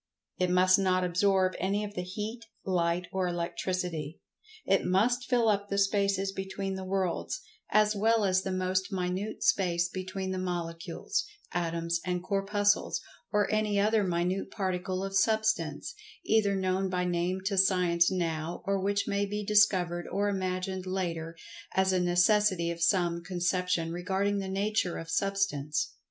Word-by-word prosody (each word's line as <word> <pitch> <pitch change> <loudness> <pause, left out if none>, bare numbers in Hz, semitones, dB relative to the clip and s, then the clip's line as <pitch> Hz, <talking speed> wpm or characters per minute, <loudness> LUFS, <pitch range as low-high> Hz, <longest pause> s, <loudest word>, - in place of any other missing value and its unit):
It 180 0 +2
must 185 +1 +5
not 185 -1 +2
absorb 185 +1 +2
any 200 +3 0
of 205 -1 -6
the 180 - -3
Heat, 215 +5 -6 0.2
Light 175 -1 0
or 190 -1 0
Electricity. 175 -2 -3 0.5
It - - +3
must 240 +7 +1
fill 240 -3 +3
up 205 -1 +1
the 200 - -1
spaces 195 -1 +1
between 195 0 -4
the 190 0 -5
worlds, 185 - -2 0.3
as 215 0 +3
well 220 +1 +3
as 185 -1 +3
the 190 - -3
most 185 +2 -1
minute 185 +3 -3
space 175 -6 +2
between 185 +1 -4
the 185 - -2
Molecules, 175 - -3 0.3
Atoms 170 -1 -1
and 180 -1 -2
Corpuscles, 205 +1 +1 0.3
or 210 -1 +2
any 210 -1 +1
other 215 +1 +3
minute 180 +2 -1
particle 185 -1 -2
of 195 0 -4
Substance, 215 -7 +1 0.3
either 210 -2 +3
known 190 0 0
by 180 -1 -1
name 180 +1 -1
to 200 0 0
Science 180 -3 +4
now 165 -2 -2
or 195 0 0
which 200 +1 0
may 200 0 0
be 210 +1 -3
discovered 185 -5 +3
or 205 +1 0
imagined 185 -1 -2
later 170 -3 -3 0.4
as 190 0 +3
a 185 - +2
necessity 180 0 +3
of 170 0 -7
some 170 -1 +2
conception 175 -1 -1
regarding 190 +3 -1
the 190 -1 -4
nature 195 -2 0
of 165 0 -7
Substance. 155 -8 0
185 Hz, 150 wpm, -29 LUFS, 175-200 Hz, 0.5 s, must